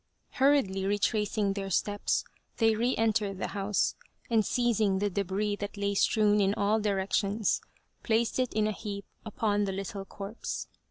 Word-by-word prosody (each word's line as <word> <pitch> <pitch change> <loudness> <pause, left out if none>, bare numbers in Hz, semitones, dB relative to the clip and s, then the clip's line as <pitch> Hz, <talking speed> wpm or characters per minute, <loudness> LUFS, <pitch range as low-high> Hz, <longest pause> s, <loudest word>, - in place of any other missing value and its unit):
Hurriedly 260 -9 +2
retracing 205 0 +1
their 195 -1 -4
steps 205 +2 0 0.3
they 225 -1 +4
re 240 +4 +1
entered 215 -3 +1
the - - -3
house, 200 0 0 0.4
and 225 -2 +4
seizing 220 -4 +1
the 205 +1 0
debris 200 +2 -1
that 205 +1 -6
lay 200 0 0
strewn 210 +1 +3
in 195 +1 +2
all 205 +2 +2
directions, 200 +1 0 0.4
placed 230 +1 +1
it 255 -1 +1
in 215 0 +1
a 215 - +1
heap 200 -1 -6 0.2
upon 205 -1 0
the 195 - -2
little 195 +1 -4
corpse. 200 +3 -5
205 Hz, 155 wpm, -29 LUFS, 200-220 Hz, 0.4 s, they